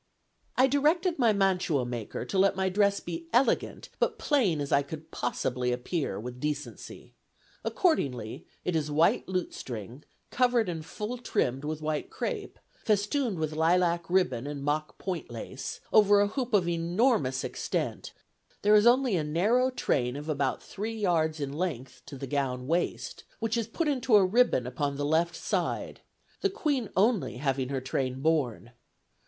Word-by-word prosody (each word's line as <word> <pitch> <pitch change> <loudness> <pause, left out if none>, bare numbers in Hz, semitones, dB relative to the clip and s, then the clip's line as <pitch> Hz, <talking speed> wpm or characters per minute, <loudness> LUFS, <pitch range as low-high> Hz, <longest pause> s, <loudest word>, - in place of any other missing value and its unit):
"I 255 - +6
directed 305 +5 +2
my 235 -3 +5
mantuamaker 160 - 0
to 195 - -1
let 195 0 +4
my 190 0 +1
dress 200 +1 +2
be 165 -1 -6
elegant, 245 +4 +1
but 460 - +1
plain 245 - +2
as 145 -1 -3
I 140 - +5
could 155 +3 -9
possibly 125 0 -1
appear, 125 - -2
with 125 +3 -7
decency; 150 +1 -5 0.5
accordingly, 125 - 0 0.2
it 180 - 0
is 155 -2 0
white 155 +3 +2
lutestring, 130 - -5 0.3
covered 245 -4 +2
and 165 -2 -4
full 215 +9 -5
trimmed 135 - -1
with 155 +1 -4
white 155 -1 -2
crape, 425 -5 -4 0.3
festooned 215 +1 +1
with 155 -1 -2
lilac 170 +1 +2
ribbon 145 -9 +1
and 145 -1 -5
mock 150 +1 -1
point 180 -4 -4
lace, 120 +3 -6
over 205 -1 +6
a 205 0 +3
hoop 245 0 -1
of 185 -4 +3
enormous 170 - +1
extent; - - -3 0.5
there 210 +1 +5
is 210 +2 +6
only 250 -3 +4
a 160 - +1
narrow 210 +12 +2
train 125 - 0
of 145 +2 -6
about 140 -4 -1
three 220 +3 -5
yards 165 -7 +1
in 140 -1 -3
length 135 -7 -4
to 140 - -8
the 135 - -5
gown 130 -2 -2
waist, 170 +5 -2
which 225 0 -1
is 230 -2 -1
put 315 +8 -2
into 260 -5 +2
a 200 -2 +7
ribbon 205 - +3
upon 140 +3 -2
the 145 - -1
left 165 +3 +1
side, - - -2 0.4
the 395 - +2
Queen 290 - -1
only 210 - +2
having 135 -1 -1
her 135 -1 -1
train 130 0 -2
borne. 135 -6 0
170 Hz, 160 wpm, -29 LUFS, 140-215 Hz, 0.5 s, a